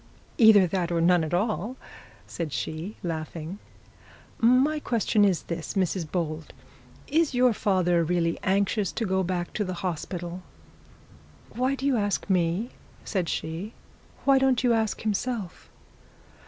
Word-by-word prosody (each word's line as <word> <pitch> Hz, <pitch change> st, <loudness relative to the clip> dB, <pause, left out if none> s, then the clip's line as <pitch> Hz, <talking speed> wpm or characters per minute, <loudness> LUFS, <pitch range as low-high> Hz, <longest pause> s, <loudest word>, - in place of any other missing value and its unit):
'Either 220 Hz, -4 st, +8 dB
that 175 Hz, -1 st, -1 dB
or 170 Hz, -, +1 dB
none 175 Hz, 0 st, +4 dB
at 155 Hz, -, -4 dB
all,' 210 Hz, +5 st, -1 dB, 0.5 s
said 165 Hz, -3 st, -5 dB
she, 160 Hz, +9 st, -4 dB
laughing. 165 Hz, +2 st, -5 dB, 0.8 s
'My 260 Hz, +6 st, +4 dB
question 225 Hz, -5 st, +1 dB
is 190 Hz, -4 st, +2 dB
this, 170 Hz, +2 st, -5 dB
Mrs 185 Hz, -3 st, 0 dB
Bold; 160 Hz, -3 st, -3 dB, 0.5 s
is 310 Hz, -2 st, +1 dB
your 250 Hz, -1 st, +4 dB
father 180 Hz, -5 st, +2 dB
really 165 Hz, 0 st, 0 dB
anxious 200 Hz, +1 st, +1 dB
to 230 Hz, -, -2 dB
get 190 Hz, -2 st, 0 dB
back 175 Hz, -1 st, -3 dB
to 210 Hz, -, -1 dB
the 185 Hz, -2 st, -4 dB
hospital?' 175 Hz, +1 st, -4 dB, 1.1 s
'Why 255 Hz, +3 st, 0 dB
do 270 Hz, -, -5 dB
you 275 Hz, -3 st, +3 dB
ask 205 Hz, -2 st, -1 dB
me?' 180 Hz, +6 st, +1 dB, 0.3 s
said 185 Hz, -5 st, -1 dB
she. 170 Hz, +8 st, -4 dB, 0.5 s
'Why 275 Hz, -1 st, +5 dB
don't 265 Hz, -2 st, +2 dB
you 245 Hz, -2 st, +4 dB
ask 220 Hz, -2 st, 0 dB
himself?' 215 Hz, -2 st, -3 dB
190 Hz, 140 wpm, -26 LUFS, 170-225 Hz, 1.1 s, Either